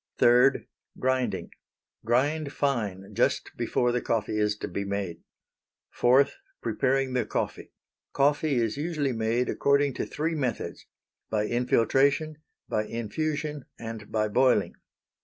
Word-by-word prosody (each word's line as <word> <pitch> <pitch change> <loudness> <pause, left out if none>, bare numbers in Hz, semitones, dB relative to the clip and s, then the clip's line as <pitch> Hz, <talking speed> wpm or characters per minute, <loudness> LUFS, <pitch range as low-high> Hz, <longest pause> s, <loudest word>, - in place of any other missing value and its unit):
3. 125 +3 +5 0.3
Grinding. 130 0 -1 0.5
Grind 140 +5 +1
fine 105 -11 -2
just - - +1
before 125 0 +1
the 120 0 0
coffee 110 -1 -1
is 105 0 +1
to - - -4
be 100 - -3
made. 100 -4 -3 0.7
4. 130 +3 +5 0.3
Preparing 135 0 0
the 125 -2 +1
Coffee. - - -3 0.4
Coffee 145 +1 +2
is 115 0 0
usually 150 -3 -1
made 115 +2 0
according 140 0 +2
to - - -3
three 160 +3 -2
methods; 125 - -3 0.4
by 105 -1 0
infiltration, 135 +6 +2 0.3
by 105 - -1
infusion, 145 +6 -3
and 115 -2 -7
by 110 -1 +1
boiling. 125 +4 +3
125 Hz, 120 wpm, -27 LUFS, 110-140 Hz, 0.7 s, 3